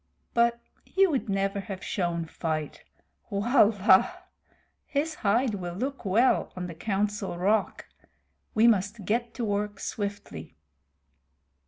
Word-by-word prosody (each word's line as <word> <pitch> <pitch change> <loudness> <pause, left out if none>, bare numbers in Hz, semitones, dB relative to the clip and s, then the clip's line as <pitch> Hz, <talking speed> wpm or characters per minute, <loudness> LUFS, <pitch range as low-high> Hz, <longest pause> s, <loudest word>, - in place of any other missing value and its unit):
"But 235 0 +3 0.2
he 390 0 +3
would 280 - -1
never 195 +1 0
have 195 -1 -7
shown 175 -3 -1
fight. 155 -2 -4 0.4
His 215 +7 +1
hide 225 +3 +2
will 175 -3 -5
look 265 +4 -4
well 225 +7 +3
on 180 -1 -4
the 175 - -6
Council 200 +1 -2
Rock. 200 +4 0 0.7
We 220 +1 +5
must 210 -2 +2
get 235 +3 -1
to 240 - -2
work 205 -1 -2
swiftly." 200 - -5
205 Hz, 115 wpm, -27 LUFS, 190-235 Hz, 0.7 s, We